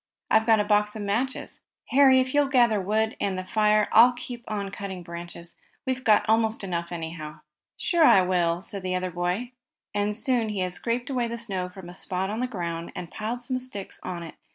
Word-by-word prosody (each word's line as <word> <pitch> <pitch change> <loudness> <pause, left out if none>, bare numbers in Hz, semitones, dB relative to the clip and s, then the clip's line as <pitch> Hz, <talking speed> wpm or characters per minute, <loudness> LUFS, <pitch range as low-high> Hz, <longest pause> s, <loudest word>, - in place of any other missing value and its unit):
I've 220 +1 +4
got 220 -1 +5
a - - +3
box 210 0 +2
of 215 - -4
matches. 235 +7 -2 0.3
Harry, 265 -1 +6
if 255 0 0
you'll 290 -1 +4
gather 240 -6 +3
wood, 220 +3 0
and 195 -2 -1
the 185 - -3
fire, 210 +1 +3
I'll 240 +3 +7
keep 240 0 -8
on 200 -2 -3
cutting 190 -3 -6
branches. 170 0 -8 0.3
We've 260 0 -2
got 215 -4 +4
almost 220 -1 +2
enough, 170 -2 -3
anyhow." 160 -2 -6 0.4
"Sure, 340 -2 +2
I 190 -10 +7
will!" 175 -1 +1
said 200 0 -4
the 185 0 -2
other 185 0 -2
boy, 180 +8 -2 0.4
and 205 0 0
soon 235 0 +1
he 205 -3 -2
had 180 -1 -1
scraped 240 +6 -2
away 245 -3 0
the 235 0 -4
snow 190 -6 -3
from 180 -1 -11
a 175 - -9
spot 190 +1 -2
on 220 - -3
the 250 - 0
ground, 170 -7 -4
and 175 - -6
had - - -22
piled 230 +3 -3
some 255 +1 -2
sticks 225 -7 -8
on 175 -2 -5
it. 165 - -9
210 Hz, 215 wpm, -26 LUFS, 180-235 Hz, 0.4 s, I'll